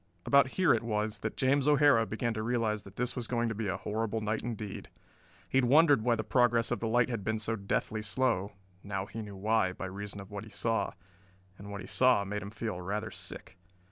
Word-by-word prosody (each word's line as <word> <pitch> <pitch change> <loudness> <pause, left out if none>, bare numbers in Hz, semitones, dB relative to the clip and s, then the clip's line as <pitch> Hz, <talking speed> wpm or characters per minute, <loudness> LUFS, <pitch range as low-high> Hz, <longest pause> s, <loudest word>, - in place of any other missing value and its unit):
About 140 -1 +5
here 185 -4 +5
it 115 - +1
was 110 -1 -1
that 110 +1 -4
James 135 +1 +2
O'Hara 145 -6 +5
began 115 +1 -2
to 110 - -3
realize 110 -2 0
that 100 -1 -14
this 125 +1 -2
was 120 -3 -4
going 120 -1 0
to - - -2
be 110 0 -3
a 95 - -1
horrible 110 +1 -2
night 110 0 -1
indeed. 110 -4 -6 0.6
He 135 - +2
had 130 - +3
wondered 145 0 +6
why 120 +1 +2
the 110 - -2
progress 120 0 +2
of 120 - 0
the 115 - -2
light 120 +2 +3
had 115 -5 -3
been 110 +2 0
so 110 +1 -1
deathly 110 +1 -2
slow. 105 -2 0 0.3
Now 95 -1 -3
he 115 +2 -7
knew 105 -2 -8
why, 100 -1 +1
by 95 - -6
reason 100 +2 -6
of 95 +1 -10
what 100 0 -5
he 110 - -11
saw 115 +2 -1 0.7
and 100 +1 -9
what 100 0 -6
he - - -9
saw 125 -5 +4
made 105 +1 -3
him 100 - -6
feel 105 -4 -4
rather 105 +4 -3
sick. 90 - -6
110 Hz, 230 wpm, -31 LUFS, 105-120 Hz, 0.7 s, wondered